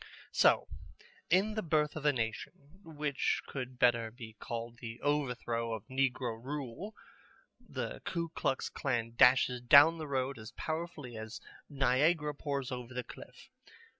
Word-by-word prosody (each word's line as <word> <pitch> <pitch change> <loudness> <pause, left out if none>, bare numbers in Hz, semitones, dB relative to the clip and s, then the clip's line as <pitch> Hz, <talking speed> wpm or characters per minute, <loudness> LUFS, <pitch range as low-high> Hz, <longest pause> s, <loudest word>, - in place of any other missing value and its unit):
So, - - +4 0.6
in 195 +5 +3
The 215 - -1
Birth 155 -4 +1
of 150 -1 -1
a - - +6
Nation, 140 - -5
which 150 -4 -1
could 130 -2 -6
better 120 -2 +3
be 115 -1 -10
called 115 0 -5
The 115 -1 -7
Overthrow 125 -5 -1
of 110 - -9
Negro 125 -3 -1
Rule, 145 - -5 0.6
the - - -5
Ku 170 -2 -2
Klux 135 -4 -1
Klan 120 -4 -2
dashes 125 0 +5
down 145 +7 +7
the 155 - -5
road 135 -2 -1
as 110 0 -10
powerfully 155 -6 -5
as 110 0 -7 0.3
Niagara 145 +3 +2
pours 140 -3 -3
over 125 0 -6
the 125 - -2
cliff. - - -13
130 Hz, 140 wpm, -33 LUFS, 120-150 Hz, 0.6 s, down